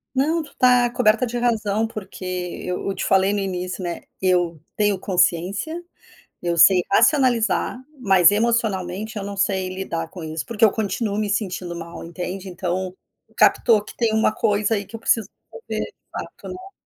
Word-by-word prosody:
não, 315 +5 +1
tu 295 - -16
tá 250 -1 +5
coberta 235 -1 +3
de 240 0 -4
razão, 225 -3 +1
porque 210 -4 -8 0.4
eu 180 0 -3
eu 195 - -2
te - - -3
falei 195 +1 +3
no 205 - 0
início, 185 -1 -3
né, 175 -1 -4 0.2
eu 175 -4 +1
tenho 205 -2 +1
consciência, 190 - 0 0.6
eu 170 -1 -1
sei 180 +2 +7
racionalizar, 240 -1 +3 0.2
mas 190 -7 +5
emocionalmente 215 -2 0
eu 200 - -3
não 200 0 -6
sei 190 -1 0
lidar 175 -3 -4
com 180 - -10
isso, 160 0 -4
porque 230 -1 +3
eu 215 - +4
continuo 205 0 -2
me 210 -1 -1
sentindo 185 -4 -2
mal, 170 0 -8
entende. 180 +3 -6
Então, 185 +1 -3 0.4
captou 220 -4 +4
que - - -12
tem 230 -2 +1
uma 220 0 +3
coisa 210 +1 +1
aí 205 - -3
que 200 - -10
eu - - -7
preciso 225 -2 +1 0.3
resolver 475 -1 -5
de - - -13 0.2
fato, - - -8
né. 370 +1 -9
200 Hz, 175 wpm, -22 LUFS, 185-225 Hz, 0.6 s, sei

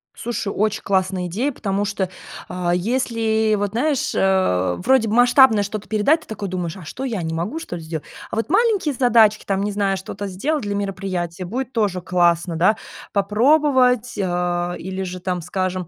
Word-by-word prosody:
Слушай, 225 -4 -3
очень 215 +1 0
классная 185 -2 0
идея, 230 +12 -1
потому 200 -5 -2
что, 200 -2 -1 0.4
а 180 -1 -2
если, 220 +1 +1
вот 205 0 -1
знаешь, 270 +5 0
э, 95 - +2
вроде 260 -3 +4
бы 215 - 0
масштабное 245 -3 +6
что-то 205 0 -6
передать, 220 +10 +2
ты - - -17
такой 205 -3 -5
думаешь: 180 -1 -4
"А 180 - -11
что, 255 - -6
я 235 -7 -2
не 160 0 -3
могу, 175 - -3
что 320 - -6
ли, 165 - -8
сделать?" 160 -1 -6 0.2
А - - -4
вот 225 - -1
маленькие 400 - +2
задачки, 230 -4 +4
там, 195 0 -1
не 205 - -1
знаю, 200 -1 0
что-то 195 +2 -6
сделать 270 +11 -2
для 205 -1 -2
мероприятия, 185 -3 -3
будет 250 +7 -4
тоже 205 -5 0
классно, 175 -1 +1
да, 185 +7 +3 0.3
попробовать, 250 +3 +3
а, 175 -1 -1
или 190 +1 -5
же, 185 -1 -5
там, 180 -1 -2
скажем, 185 0 -3
200 Hz, 180 wpm, -21 LUFS, 180-235 Hz, 0.4 s, масштабное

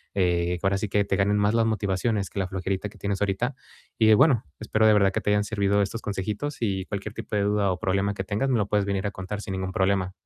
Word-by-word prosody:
eh, 90 -2 +1
que 95 - 0
ahora 100 0 +1
sí 100 0 -3
que 100 0 +1
te 95 - 0
ganen 100 +1 +2
más 105 +1 +2
las 115 -1 +3
motivaciones 100 -1 0
que 100 - -5
la 95 - 0
flojerita 95 +2 -3
que - - -18
tienes 100 0 -3
ahorita. 105 +7 0 0.4
Y 110 -1 +5
bueno, 125 -3 +4 0.2
espero 110 0 +1
de - - +7
verdad 100 -2 +4
que - - -1
te - - -1
hayan 105 0 +3
servido 100 -1 +1
estos 105 +3 -2
consejitos, 105 +8 -3
y 95 -4 -1
cualquier 105 0 -5
tipo - - -5
de 100 - +1
duda 100 -1 +1
o 90 - -3
problema 100 +2 0
que 95 -1 -5
tengas, 110 +8 -1
me 125 - +2
lo 100 -2 0
puedes 105 -1 +1
venir 100 0 -1
a - - -3
contar, 95 +2 -6
sin 95 - -5
ningún 95 0 -3
problema. 95 -1 -1
100 Hz, 265 wpm, -25 LUFS, 95-105 Hz, 0.4 s, de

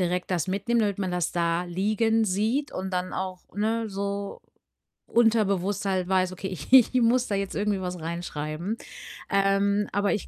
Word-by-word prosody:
direkt 180 +1 -1
das 180 -1 0
mitnehmen, 205 +5 +1
damit 205 -2 0
man 190 -2 -1
das 180 -1 -1
da 170 0 0
liegen 215 +5 +1
sieht 220 +9 0
und 190 0 -4
dann 180 0 -2
auch, 185 -1 -4
ne, 220 +2 -1
so 200 0 -4 0.7
unterbewusst 205 -4 +2
halt 185 -2 0
weiß: 185 -1 +2
„Okay, 190 +1 -5
ich 170 - -8
ich 260 -2 +8
muss 240 +2 +3
da 205 - -1
jetzt 195 -1 -3
irgendwie 205 -1 0
was 180 -1 -4
reinschreiben.“ 165 +2 -4 0.5
Ähm, 200 +1 +2
aber 205 +1 +2
ich 210 - -3
195 Hz, 170 wpm, -26 LUFS, 180-210 Hz, 0.7 s, ich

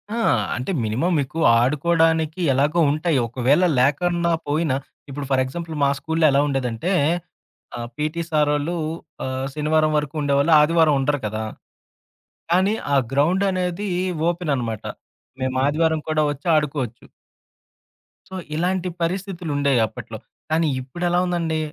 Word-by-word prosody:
ఆ! - - -2 0.4
అంటే, 125 +9 -3
మినిమం 125 +12 0
మీకు 140 +4 -3 0.2
ఆడుకోవడానికి 160 +4 +1
ఎలాగో 145 +6 +1
ఉంటాయి. 155 0 0
ఒకవేళ 130 +7 +2 0.2
లేకన్న 170 +6 +1 0.2
పోయినా 150 -2 +1 0.3
ఇప్పుడు 140 +1 -5
ఫర్ 130 -1 +3
ఎగ్జాంపుల్ 160 +5 -6
మా 140 - +4
స్కూల్లో 160 0 0
ఎలా 140 +1 +3
ఉండేదంటే 135 +4 -2 0.9
ఆ! - - -6 0.2
పీటీ 155 +3 -2
సారోళ్ళు 150 +1 +1 0.5
ఆహ్, 130 0 -3
శనివారం 155 +1 +1
వరకు 150 0 -4
ఉండేవాళ్ళు 140 +3 +2
ఆదివారం 160 0 +4
ఉండరు 145 +1 0
కదా! 110 +1 -3 1.1
కానీ 190 +4 +3 0.2
ఆ - - +5 0.2
గ్రౌండ్ 165 +8 +2
అనేది 185 +2 -2 0.4
ఓపెన్ 175 -3 -1
అనమాట. 115 -4 -4 0.6
మేము 130 0 -1
ఆదివారం 160 +1 +1
కూడా 155 -1 +2
వచ్చి 145 +2 -9
ఆడుకోవచ్చు. 140 -6 -2 1.2
సో 190 - -8 0.2
ఇలాంటి 180 +2 0
పరిస్థితులు 180 -1 -3
ఉండేయి 140 -3 +2
అప్పట్లో. - - -9 0.3
కానీ 160 +1 +2
ఇప్పుడ 130 +7 -10
ఎలా 175 - +2
ఉందండి? 170 -3 -1
155 Hz, 130 wpm, -22 LUFS, 140-170 Hz, 1.2 s, ఆ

